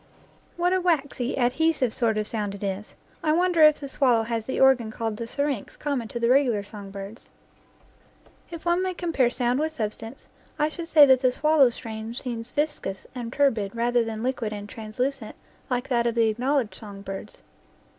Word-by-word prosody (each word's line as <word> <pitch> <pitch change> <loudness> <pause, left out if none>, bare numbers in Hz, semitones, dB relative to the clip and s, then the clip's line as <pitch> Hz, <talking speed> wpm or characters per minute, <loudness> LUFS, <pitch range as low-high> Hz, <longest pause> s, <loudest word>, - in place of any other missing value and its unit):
What 355 +1 +2
a 375 - +2
waxy, 285 -7 0
adhesive 260 0 +1
sort 230 -4 +1
of 215 - 0
a - - -8
sound 210 -3 -3
it 200 - -9
is! 200 +1 -4 0.3
I 310 - +3
wonder 350 0 +2
if 305 -1 +7
the 280 - -6
swallow 250 -4 +2
has 225 -1 -3
the 260 - -2
organ 260 -4 +4
called 220 -1 -3
the 230 - -5
syrinx 280 -3 -3
common 280 -6 -2
to 235 - -5
the 235 - +1
regular 245 -5 +3
song 205 -1 -10
birds. 200 +3 -9 1.2
If 335 -1 -9
one 345 +1 +2
may 370 -1 -2
compare 325 -9 +1
sound 245 +1 0
with 315 +1 -1
substance 225 +1 -5 0.3
I 300 +1 +2
should 330 +1 -6
say 305 -3 +8
that 260 -2 +5
the 255 -1 +3
swallow's 290 -3 +3
strain 225 0 -7
seems 240 -2 -4
viscous 290 -10 -2
and 240 -2 -5
turbid 230 -8 +1
rather 240 +1 +2
than 225 0 -5
liquid 245 -4 -2
and 205 0 -7
translucent 225 +3 -4 0.3
like 250 -1 -1
that 235 -2 +2
of 235 - -1
the 230 -1 +3
acknowledged 250 +1 0
song 200 -3 -9
birds. 195 +1 -8
245 Hz, 190 wpm, -25 LUFS, 220-285 Hz, 1.2 s, say